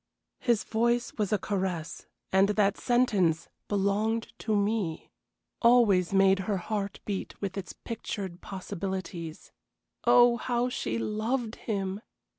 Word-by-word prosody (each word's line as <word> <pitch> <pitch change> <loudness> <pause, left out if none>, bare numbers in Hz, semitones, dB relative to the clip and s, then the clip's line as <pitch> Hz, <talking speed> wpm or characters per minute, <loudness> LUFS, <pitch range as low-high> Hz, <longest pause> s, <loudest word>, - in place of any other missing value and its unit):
His 235 -4 +2
voice 235 +2 +1
was 210 -3 0
a 210 - +4
caress, 185 -5 -3 0.2
and 195 +1 +4
that 205 -1 +3
sentence, 200 -10 +2 0.2
"belonged 210 +3 0
to 220 -1 0
me," 205 -5 -1 0.5
always 225 -7 +5
made 195 0 +5
her 200 - +2
heart 200 +1 -3
beat 200 -2 -4
with 195 -2 -3
its 195 -3 -5
pictured 200 -5 -6
possibilities. 190 -3 -5 0.5
Oh, 240 0 +6
how 245 +1 0
she 115 - -2
loved 220 - -1
him! 195 -2 -3
205 Hz, 120 wpm, -29 LUFS, 190-225 Hz, 0.5 s, Oh